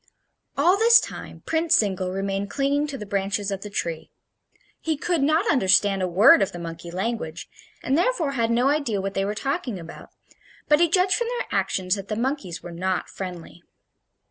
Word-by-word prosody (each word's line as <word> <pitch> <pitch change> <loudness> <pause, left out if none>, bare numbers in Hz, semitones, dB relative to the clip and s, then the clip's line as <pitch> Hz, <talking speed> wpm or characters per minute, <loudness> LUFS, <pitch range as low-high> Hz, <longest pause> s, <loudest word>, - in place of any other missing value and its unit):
All 350 +7 +4
this 465 +1 +7
time - - -8
Prince 325 0 +2
Zingle 190 -3 0
remained 195 +1 -3
clinging 285 +1 0
to 285 -2 -6
the 210 - -7
branches 200 0 -2
of 195 -1 -4
the 210 - -7
tree. 170 -5 -4 0.7
He 320 -2 -2
could 340 0 -1
not 315 +8 +2
understand 195 - +3
a 185 - 0
word 190 +5 +6
of 195 - 0
the - - -6
monkey 170 0 -7
language, 180 -3 -4 0.4
and 265 - +1
therefore 345 - +1
had 230 -4 0
no 240 +3 +2
idea 280 -9 0
what 195 0 -3
they 195 0 -1
were 205 +1 -3
talking 270 - -3
about; 165 -1 -11 0.6
but 300 0 +4
he 340 -1 +4
judged 370 +2 +3
from 475 - 0
their 485 0 -3
actions 185 -1 0
that 200 -1 -4
the 215 - -3
monkeys 230 - -3
were 175 - -8
not 185 +2 -2
friendly. 180 -2 -8
210 Hz, 190 wpm, -24 LUFS, 190-295 Hz, 0.7 s, this